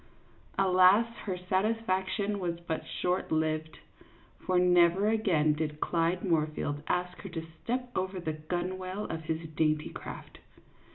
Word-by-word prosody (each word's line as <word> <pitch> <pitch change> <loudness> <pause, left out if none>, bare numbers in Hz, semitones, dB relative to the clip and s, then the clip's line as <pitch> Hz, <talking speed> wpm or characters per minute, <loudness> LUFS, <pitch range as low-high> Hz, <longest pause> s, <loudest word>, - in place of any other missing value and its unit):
Alas, 190 +3 +6 0.2
her 190 -3 -2
satisfaction 200 +1 0
was 170 -2 -2
but 165 -2 -3 0.2
short 180 +1 0
lived; 155 -1 0 0.6
for 185 - 0
never 180 +2 +5
again 180 -9 +3
did 150 0 -3
Clyde 170 +2 0
Moorfield 155 -4 0
ask 180 0 -1
her 195 - -7
to 165 -2 -5 0.2
step 250 +1 -2
over 185 0 -1
the 160 -3 -2
gunwale 185 +5 -3
of 165 -1 -5
his 160 +1 -2
dainty 155 -1 +1
craft. - - -9
180 Hz, 130 wpm, -30 LUFS, 160-190 Hz, 0.6 s, Alas